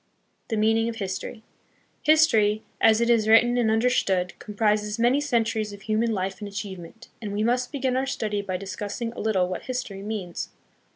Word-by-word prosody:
The 225 - -2
Meaning 225 +2 +2
of 230 - -5
History. 205 +2 -5 0.6
History, 220 -10 +4 0.2
as 220 0 +5
it 235 - +2
is 220 -2 +3
written 240 +2 +5
and 240 -3 +2
understood, 220 -6 +1
comprises 210 0 0
many 245 +5 +3
centuries 230 -6 0
of 200 -1 -12
human 225 +2 +1
life 190 -2 -2
and 205 - -6
achievement, 200 +1 -8
and 210 -2 -5
we 205 +1 -1
must 245 +2 0
begin 265 -3 -1
our 265 +1 0
study 210 -6 -2
by 185 -2 -3
discussing 205 +4 -5
a - - -9
little 195 -4 +1
what 180 - -5
history 250 -6 -4
means. 200 -4 -5
220 Hz, 175 wpm, -25 LUFS, 205-235 Hz, 0.6 s, as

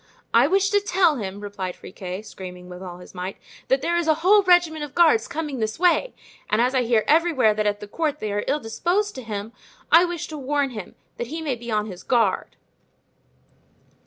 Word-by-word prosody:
"I 235 +4 +6
wish 390 +4 +2
to 410 - +4
tell 360 -6 +2
him," 200 -2 -5
replied 195 -3 -5
Friquet, 185 +1 -7
screaming 180 -3 -9
with 180 0 -9
all 180 -2 -8
his 180 - -14
might, 185 +1 -5 0.3
"that 265 +1 +2
there 340 - +1
is 345 -1 0
a 315 - +4
whole 410 +2 +7
regiment 350 -5 +3
of 290 -2 -8
guards 320 -10 +4
coming 295 -4 -4
this 220 0 -2
way. 360 +8 +2 0.3
And 210 - +2
as 250 +2 +2
I 260 - +3
hear 230 -2 +2
everywhere 300 -8 +4
that 210 0 0
at 205 0 -1
the 210 - -7
court 300 +5 -2
they 215 -7 -4
are 205 - -1
ill 290 +3 +1
disposed 355 - -1
to 260 - -7
him, 215 -1 -6 0.4
I 340 +2 +7
wish 345 -2 -4
to 305 -2 -6
warn 280 0 0
him, 210 -6 -8 0.2
that 240 - -4
he 315 +6 -5
may 310 -4 -2
be 235 0 -8
on 210 -1 0
his 185 -4 -8
guard." 230 -6 +1
255 Hz, 215 wpm, -23 LUFS, 210-325 Hz, 0.4 s, whole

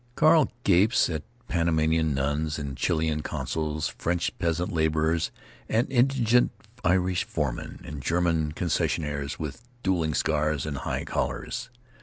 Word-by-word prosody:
Carl 155 -1 +5
gapes 95 +1 +4
at 80 -2 -2 0.3
Panamanian 80 -2 +2
nuns 75 +3 0
and 70 -3 -4
Chilean 80 +2 0
consuls, 80 0 -2
French 85 0 -2
peasant 85 0 0
laborers 80 0 +1 0.4
and 115 +3 +2
indignant 125 -2 +4 0.3
Irish 90 +1 +2
foremen - - -3
and 75 -2 -7
German 80 0 +1
concessionaries 75 -4 -1
with 75 +5 -5 0.2
dueling 85 -5 +1
scars 75 -1 +1
and 75 -2 -3
high - - -3
collars. - - -3
80 Hz, 120 wpm, -27 LUFS, 75-90 Hz, 0.4 s, Carl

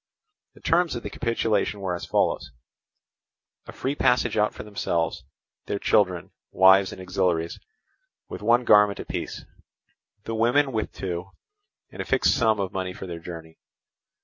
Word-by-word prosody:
The - - -18
terms 170 0 +2
of 120 - -5
the 105 - -6
capitulation 110 -3 0
were 95 -2 -2
as 85 - -5
follows: 65 - 0 1.2
a - - -7
free 135 - -3
passage 125 -5 +2
out 105 -1 +2
for - - -9
themselves, 85 -8 -2 0.4
their 100 - -1
children, 90 -4 +1 0.2
wives 95 +1 +5
and - - -9
auxiliaries, 90 -3 -1 0.7
with - - -8
one 120 +3 +3
garment 105 -2 +5
apiece, - - -5 0.8
the 115 - -5
women 120 +5 +2
with 110 -3 -2
two, 90 0 -5 0.6
and - - -6
a - - -5
fixed - - +3
sum 110 -3 +2
of 95 -2 -2
money 95 -1 -3
for 95 - -8
their 85 -2 -6
journey. 80 -1 -10
100 Hz, 150 wpm, -25 LUFS, 90-115 Hz, 1.2 s, wives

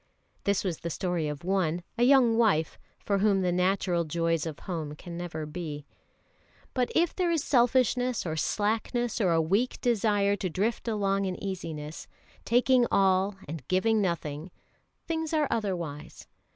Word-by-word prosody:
This 200 -1 +1
was 180 -5 -2
the 170 - -4
story 170 0 -1
of 150 0 -5
one, 175 -2 0
a 240 - -3
young 245 -2 +5
wife, 205 -9 +2 0.3
for 200 -1 +1
whom 200 -1 +3
the 180 - +1
natural 180 -1 +1
joys 165 0 0
of 155 - -6
home 160 -5 -4
can 170 +2 -9
never 170 -3 -5
be. 150 -2 -6 0.9
But 250 -2 0
if 340 0 +2
there 360 -2 +1
is 325 -4 +1
selfishness 250 -1 +2
or 160 -2 -2
slackness 225 +7 -1
or 190 - +3
a 165 - +3
weak 200 +10 +1
desire 205 -4 +2
to 185 - -2
drift 210 +8 -1
along 200 -3 0
in 185 -1 -2
easiness, 165 -6 -6 0.4
taking 245 +1 +4
all 190 +1 +3
and 155 +1 -6
giving 215 +4 +2
nothing, 165 -3 -3 0.6
things 320 -1 -2
are 300 -2 +2
otherwise. 175 -10 -4
195 Hz, 155 wpm, -28 LUFS, 165-230 Hz, 0.9 s, young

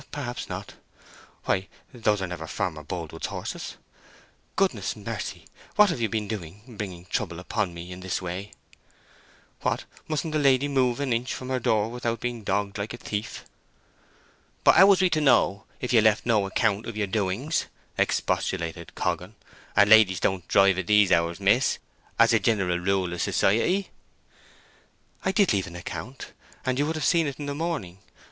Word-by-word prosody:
"Perhaps 125 -5 -5
not. - - -6 0.7
Why, 95 +1 0 0.3
those 105 -5 +1
are - - -2
never 85 -2 -6
Farmer 80 -1 -3
Boldwood's 80 0 -5
horses! - - -6 0.8
Goodness - - 0
mercy! - - -6 0.3
what 210 -3 +6
have 130 - -3
you 115 - +1
been 105 0 -2
doing—bringing 100 -1 -7
trouble 85 -3 -3
upon 90 0 -2
me 85 +2 -8
in 90 - -7
this 95 0 -2
way? 95 +3 -5 1.1
What! - - -1 0.2
mustn't 155 0 -2
a 155 - +2
lady 140 -1 +4
move 130 -3 +1
an 140 -4 0
inch 120 +3 -1
from 130 - -7
her 130 -1 0
door 110 -2 +2
without 120 -1 -2
being 120 -2 -4
dogged 100 +1 -1
like 105 +4 -4
a - - -11
thief?" 105 -2 -5 1.2
"But - - +7
how 195 - +8
was 195 -1 +5
we 185 - +4
to 155 -1 +2
know, 110 -7 +3
if 125 - -2
you 115 - +7
left 110 -1 +3
no 110 -4 +2
account 105 +1 0
of 115 -2 -6
your 105 - +1
doings?" 105 - -1 0.3
expostulated 85 -2 -1
Coggan, 95 +4 -2 0.4
"and 100 0 +6
ladies 105 -5 +6
don't 95 -1 -1
drive 95 -1 +4
at 90 - -4
these 105 -2 +5
hours, 85 0 +2
miss, - - +3 0.4
as - - +5
a - - +5
jineral 95 -6 +1
rule 95 -1 0
of 90 - -3
society." 180 - +2 1.3
"I 190 - +1
did 200 - +3
leave 95 -2 0
an 85 - -10
account—and 130 +6 -6
you 145 - +2
would 160 - -2
have 155 - -2
seen 165 -3 +3
it 140 - -5
in 145 - -5
the 145 - -3
morning. 145 - -3
105 Hz, 170 wpm, -26 LUFS, 95-130 Hz, 1.3 s, how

